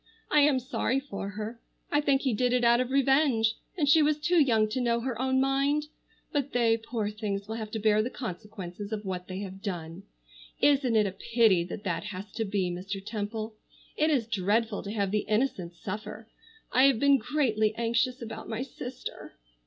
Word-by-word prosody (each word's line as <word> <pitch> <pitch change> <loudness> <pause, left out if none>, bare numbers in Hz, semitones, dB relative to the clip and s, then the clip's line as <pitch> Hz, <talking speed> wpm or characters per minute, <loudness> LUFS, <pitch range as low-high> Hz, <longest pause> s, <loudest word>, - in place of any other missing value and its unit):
I 300 - +6
am 290 -2 +5
sorry 260 +1 -1
for 200 -7 -6
her. 215 +3 -6 0.3
I 295 - +3
think 275 -2 +2
he 265 -4 +1
did 245 +3 +1
it 250 -1 +2
out 235 +1 +5
of 250 - -2
revenge, 270 -4 +3 0.2
and 300 -4 +1
she 310 +3 +6
was 300 0 +3
too 335 +2 +3
young 225 -6 +3
to 250 +4 -1
know 235 -1 +2
her 245 -1 -3
own 260 0 +2
mind. 275 +3 +1 0.4
But 285 -2 -1
they, 235 -2 +4
poor 225 -2 -3
things, 205 -2 -4
will 220 - -4
have 220 -2 -5
to 220 - -4
bear 215 0 +3
the 235 - -2
consequences 205 -3 -7
of 215 -1 -4
what 180 -1 -4
they 185 +1 -5
have 190 -1 -7
done. 175 -3 -5 0.6
Isn't 275 -5 +3
it 215 -1 +4
a 195 - -1
pity 215 -2 +3
that 200 +4 -7
that 185 0 -2
has 205 0 -7
to 225 - -2
be, 195 -3 -1
Mr. 190 +3 -4
Temple? 215 +1 -4 0.4
It 310 +1 +2
is 270 -7 +2
dreadful 210 +1 0
to 200 - -6
have 200 -3 -1
the 210 0 0
innocent 210 -7 0
suffer. 210 +4 -6 0.4
I 260 +2 +5
have 270 -5 +4
been 280 0 +5
greatly 220 -4 +1
anxious 235 +2 0
about 225 -1 -7
my 225 +2 -2
sister." 255 -1 -8
225 Hz, 200 wpm, -28 LUFS, 205-260 Hz, 0.6 s, I